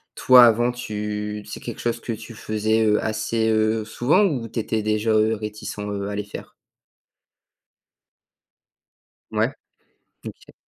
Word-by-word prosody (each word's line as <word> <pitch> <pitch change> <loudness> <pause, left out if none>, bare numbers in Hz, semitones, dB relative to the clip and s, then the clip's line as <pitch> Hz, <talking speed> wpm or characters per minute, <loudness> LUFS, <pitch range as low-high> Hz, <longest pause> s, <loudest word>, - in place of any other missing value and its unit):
toi 125 -1 +8
avant 120 +2 +3
tu 105 -2 -4
c'est 105 - -7
quelque 120 - -7
chose 120 0 -1
que 115 - -4
tu 110 +1 -9
faisais, 110 +1 0
heu, 105 0 +2
assez, 110 +1 -1
heu, 110 0 +1
souvent 130 - +2
ou 130 - 0
tu 115 - -4
étais 110 0 -2
déjà, 110 +1 0
heu, 110 +1 +3
réticent, 105 0 -7
heu, 100 -1 -4
à 100 - -4
les 105 - -2
faire? 100 - -10 2.8
Ouais. - - +1 0.7
Ok. - - -11
110 Hz, 140 wpm, -23 LUFS, 105-115 Hz, 2.8 s, toi